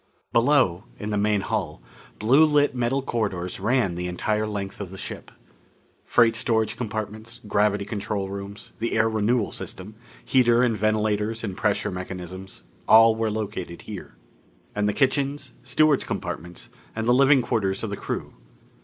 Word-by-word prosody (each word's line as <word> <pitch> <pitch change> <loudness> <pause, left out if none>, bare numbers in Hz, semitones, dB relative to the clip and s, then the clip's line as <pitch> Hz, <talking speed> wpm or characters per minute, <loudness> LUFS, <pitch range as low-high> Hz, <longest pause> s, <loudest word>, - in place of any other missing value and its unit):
Below, 115 -7 +3
in 105 0 -5
the - - 0
main 105 0 +2
hull, 95 -7 -3 0.4
blue 130 +9 +5
lit 150 -2 +3
metal 125 +2 0
corridors 100 -8 -2
ran 120 -6 +1
the 90 +1 -3
entire 105 +4 -1
length 100 -1 -5
of 100 - -5
the 95 - -10
ship. - - -7 0.8
Freight 115 -1 +4
storage 110 -1 +1
compartments; 110 -1 -5
gravity 100 -1 +1
control 100 -1 -3
rooms; 100 +1 -8
the 115 - -2
air 110 0 +3
renewal 110 +1 +1
system; 95 +3 -7 0.3
heater 120 -2 +4
and 120 -3 +2
ventilators 110 +1 0
and 100 -4 -4
pressure - - 0
mechanisms 95 +1 -7 0.2
all 115 0 +7
were 110 0 0
located 105 -5 -5
there. - - -8 0.6
And 105 0 +1
the - - 0
kitchens, 140 +1 0
stewards' 145 +2 +3
compartments, 85 +2 -6 0.3
and 110 0 -2
the 120 - +5
living 135 0 +5
quarters 95 -4 -1
of 110 - -3
the - - -2
crew. - - -5
110 Hz, 155 wpm, -24 LUFS, 100-120 Hz, 0.8 s, all